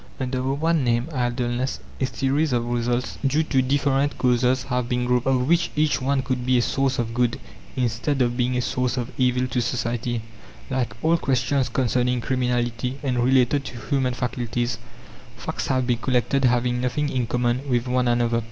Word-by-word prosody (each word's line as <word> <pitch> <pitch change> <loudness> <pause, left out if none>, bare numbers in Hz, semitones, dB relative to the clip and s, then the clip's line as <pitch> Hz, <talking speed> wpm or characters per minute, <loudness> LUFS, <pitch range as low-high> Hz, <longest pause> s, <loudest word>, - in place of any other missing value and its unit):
Under 130 -1 -2
the 135 +1 0
one 160 0 +1
name, 120 +3 +1
idleness, 125 0 -1 0.2
a 130 - +1
series 135 +4 0
of 120 -1 +1
results 120 +1 -1
due 145 +4 +2
to 135 -4 +2
different 140 +1 +1
causes 125 0 +2
have 125 -1 -2
been 125 0 0
grouped, 125 0 +1
of 130 -1 +2
which 170 +1 +3
each 150 -2 +2
one 135 0 +1
could 130 -2 -2
be 125 0 +3
a - - +3
source 135 0 0
of 115 -1 -2
good, 120 0 +1 0.4
instead 125 +3 0
of 120 -1 +2
being 125 0 0
a 125 - 0
source 125 0 -1
of 120 0 -3
evil 125 0 +2
to 125 +1 0
society. 120 -1 -2 0.5
Like 125 -5 -1
all 165 +2 +4
questions 130 0 +1
concerning 125 0 +1
criminality 125 0 -1
and 125 -3 0
related 130 +2 +3
to 125 - -7
human 125 +3 0
faculties, 120 -2 -2 0.6
facts - - -4
have 130 -1 +1
been 120 -2 0
collected 130 +3 +1
having 125 0 +2
nothing 125 +4 0
in 125 -4 -1
common 125 +4 0
with 120 0 +1
one 125 0 +1
another. 120 -1 +2
125 Hz, 180 wpm, -23 LUFS, 120-135 Hz, 0.6 s, all